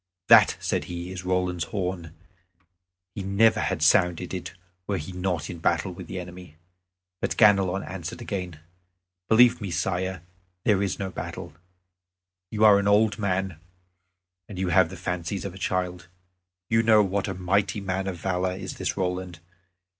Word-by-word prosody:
"That," - - +7
said - - -1
he, 85 +1 -6
"is 95 0 -6
Roland's 90 -2 -1
horn; 90 -5 -4 1.0
he 100 - -5
never 100 +4 +3
had - - -1
sounded 90 +1 +3
it 90 - -5 0.3
were 100 - 0
he 85 +3 -6
not 90 -1 -2
in 85 - -7
battle 85 +2 0
with 85 - -9
the 95 - -5
enemy." 90 -3 -10 0.6
But - - -2
Ganelon 100 -3 +4
answered 85 0 -7
again: 90 -9 -5 0.7
"Believe 120 +1 +5
me, 100 - -4
Sire, 90 +1 -2 0.4
there 100 -3 +3
is 100 - -1
no 95 -1 -4
battle. 80 - -7 1.0
You 110 0 +2
are 100 -2 +7
an 100 - -1
old 105 +1 +3
man, 95 -4 -1 0.9
and 100 - -8
you 95 -1 -1
have 90 -1 +4
the 95 - -9
fancies 90 +2 -3
of 100 - -5
a 95 - -11
child. 90 -1 -2 0.6
You 115 0 +3
know 110 -2 +5
what 100 +1 -1
a 95 - -3
mighty 95 +2 0
man 95 0 -3
of 95 -2 -3
valor 90 +1 -1
is 95 -1 -7
this - - -2
Roland. 90 -2 -3
95 Hz, 160 wpm, -25 LUFS, 90-100 Hz, 1.0 s, That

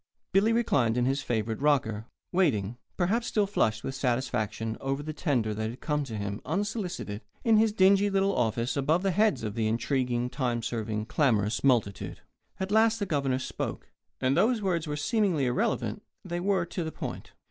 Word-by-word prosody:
Billy 200 +4 +4
reclined 135 - +2
in 125 - +2
his 135 +2 +1
favourite 110 0 -2
rocker, 115 -7 +1 0.2
waiting, 120 - +1 0.2
perhaps 215 +7 +1
still 210 -2 +2
flushed 110 - 0
with 135 - -3
satisfaction 115 -4 -1
over 135 +1 -2
the 155 +1 -5
tender 125 -9 0
that 110 +1 -2
had 120 +3 -8
come 150 -1 -1
to 115 -5 -5
him, 100 0 -4
unsolicited, 180 - -3 0.2
in 225 -2 +5
his 220 0 +4
dingy 200 0 +4
little 195 0 +2
office, 115 +1 0
above 150 +6 +1
the 195 - +2
heads 210 - +2
of 105 -2 -3
the 110 -1 0
intriguing, 120 +1 0
time 125 -3 -2
serving, 110 -2 -2
clamorous 110 -6 +1
multitude. 115 -7 +1 0.4
At 190 +1 -3
last 220 +1 +4
the 205 - -2
Governor 140 -6 0
spoke; 130 - -5 0.3
and, 130 +1 +2
though 225 - +4
his 245 -3 0
words 170 -4 0
were 150 0 -3
seemingly 180 - +1
irrelevant, 125 0 0 0.2
they 175 -1 -3
were 190 -1 +1
to 175 +1 -4
the 160 - -4
point. - - -7
140 Hz, 180 wpm, -28 LUFS, 115-190 Hz, 0.4 s, in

